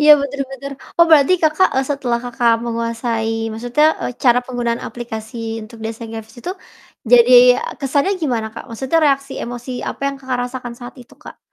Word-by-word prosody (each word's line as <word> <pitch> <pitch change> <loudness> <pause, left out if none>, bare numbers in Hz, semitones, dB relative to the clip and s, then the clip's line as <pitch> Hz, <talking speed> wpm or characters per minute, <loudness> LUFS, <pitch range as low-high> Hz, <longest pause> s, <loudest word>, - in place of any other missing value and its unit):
iya, 300 0 +6
bener 280 0 -4
bener, 275 +1 -7 0.3
oh 340 - +8
berarti 300 +1 +6
Kakak, 315 +4 +4
eee, 265 +1 +1
setelah 250 -4 -1
Kakak 240 -1 +1
menguasai 230 -1 -2 0.2
maksudnya, 245 +6 0 0.2
eee, 250 - -2
cara 245 -1 +6
penggunaan 240 -2 -3
aplikasi 225 -1 -6
untuk 220 +1 -12
desain 225 0 -6
grafis 225 +1 -9
itu 360 - -4 0.6
jadi 245 +1 +7 0.5
kesannya 280 +7 +1
gimana, 235 -7 -1
Kak? - - -8
Maksudnya 265 +8 0
reaksi 275 -1 0
emosi 245 +1 -6 0.2
apa - - -10
yang 275 - -8
Kakak 260 -2 -3
rasakan 245 -2 -7
saat 245 0 -9
itu, - - -20
Kak? - - -12
245 Hz, 170 wpm, -18 LUFS, 230-275 Hz, 0.6 s, oh